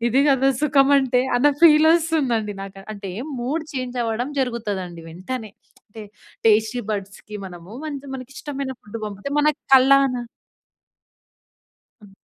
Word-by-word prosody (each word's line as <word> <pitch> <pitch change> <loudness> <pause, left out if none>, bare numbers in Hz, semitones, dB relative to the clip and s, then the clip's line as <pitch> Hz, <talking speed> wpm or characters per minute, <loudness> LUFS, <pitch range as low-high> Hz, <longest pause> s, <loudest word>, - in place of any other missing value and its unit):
ఇది 255 +4 +3
కదా 270 0 +3
సుఖం 275 -2 +3
అంటే. 250 -2 +2 0.2
అన్న 280 +4 +4
ఫీల్ 310 -1 +7
వస్తుందండి 275 -11 0
నాకు, 195 0 -10
అంటే 200 -2 -7 0.3
మూడ్ 300 +6 -2
చేంజ్ 255 -2 -4
అవ్వడం 230 +4 -2
జరుగుతదండి 200 -9 -3
వెంటనే. 215 +7 -6 0.4
అంటే 215 +1 -10 0.4
టేస్టీ 220 +3 +3
బడ్స్‌కి 200 +1 -6
మనము 175 +1 -11 0.4
మనకి 255 0 -8
ఇష్టమైన 275 -3 -5
ఫుడ్ 210 +2 -8
పంపితే 200 +4 -6
మన 300 +1 +4 0.3
కళ్ళనా 265 -1 +5 1.8
హ్మ్. 200 -2 -17
245 Hz, 120 wpm, -22 LUFS, 205-275 Hz, 1.8 s, ఫీల్